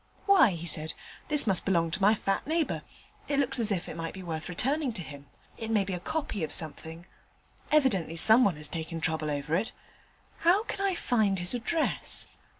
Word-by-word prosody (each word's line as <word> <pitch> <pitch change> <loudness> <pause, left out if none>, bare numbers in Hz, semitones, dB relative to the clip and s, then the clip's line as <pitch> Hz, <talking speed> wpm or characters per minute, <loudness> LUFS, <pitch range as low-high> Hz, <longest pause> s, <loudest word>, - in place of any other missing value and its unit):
"Why," 375 - +5
he 170 0 -6
said, 155 -1 +2 0.3
"this 295 -4 +3
must 195 -5 +2
belong 170 -4 +1
to 185 - -3
my 205 +3 +5
fat 195 +2 -2
neighbour. 320 +1 -1 0.5
It 285 - -1
looks 265 -2 +2
as 220 -2 +4
if 185 -4 -2
it - - -7
might 165 +1 -5
be 190 - -8
worth 160 -2 -5
returning 265 - -1
to 185 -5 -4
him; 140 -2 -11 0.3
it 225 - -5
may 215 -3 +2
be 195 0 -5
a 180 - -3
copy 280 - -3
of 155 - -3
something; 160 +1 -2 0.7
evidently 230 - +2
someone 220 0 +5
has 150 0 -2
taken 165 +1 -5
trouble 160 -1 -2
over 145 +2 -2
it. 210 +6 -1 0.7
How 365 +6 +3
can 405 - -5
I 390 -2 +1
find 220 - +1
his 175 +3 0
address?" 250 +7 0
195 Hz, 195 wpm, -28 LUFS, 165-255 Hz, 0.7 s, Why